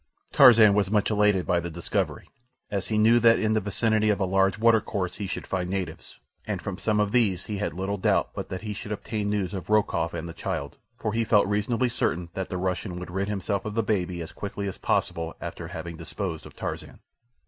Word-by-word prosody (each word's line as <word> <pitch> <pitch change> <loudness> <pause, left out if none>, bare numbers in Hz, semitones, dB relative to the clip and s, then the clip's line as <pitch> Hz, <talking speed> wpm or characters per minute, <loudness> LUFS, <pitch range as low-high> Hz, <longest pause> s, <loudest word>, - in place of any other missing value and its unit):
Tarzan 110 -4 +8
was 100 -2 +2
much 105 +1 +2
elated 105 -3 +3
by 90 - +2
the 85 0 -4
discovery, 85 +1 -2 0.4
as 100 -2 -2
he 110 - 0
knew 115 +3 +5
that 115 0 +6
in 110 0 +1
the 110 - +2
vicinity 110 +2 +1
of 105 - +2
a 95 - +2
large 95 +2 +2
watercourse 110 -5 +1
he 100 - -4
should 90 - -4
find 90 -2 -2
natives, 95 -1 -5 0.3
and - - -2
from 100 -2 -5
some 105 -1 +1
of 105 -1 +1
these 105 -7 +2
he 105 - -4
had 100 -6 -2
little 95 +2 -2
doubt - - +2
but - - -6
that 95 +2 -5
he 105 -1 -3
should 105 +1 -7
obtain 105 0 -3
news 100 -3 -1
of 95 -2 -6
Rokoff 100 -6 +1
and 85 0 -4
the 85 - -7
child, - - -4 0.2
for 110 - -2
he 115 0 +1
felt 105 -2 +4
reasonably 105 +5 +1
certain 90 -7 -1
that 95 -1 -4
the 90 - -3
Russian 90 0 -2
would 90 -1 -7
rid 95 +2 -1
himself 100 -1 -2
of 105 -1 -5
the 115 - +2
baby 90 -5 -1
as 80 - -9
quickly 100 0 -5
as 95 - -6
possible 80 0 -1
after 85 - -6
having 85 -1 -7
disposed 85 0 -5
of - - -16
Tarzan. - - -6
100 Hz, 225 wpm, -26 LUFS, 90-105 Hz, 0.4 s, Tarzan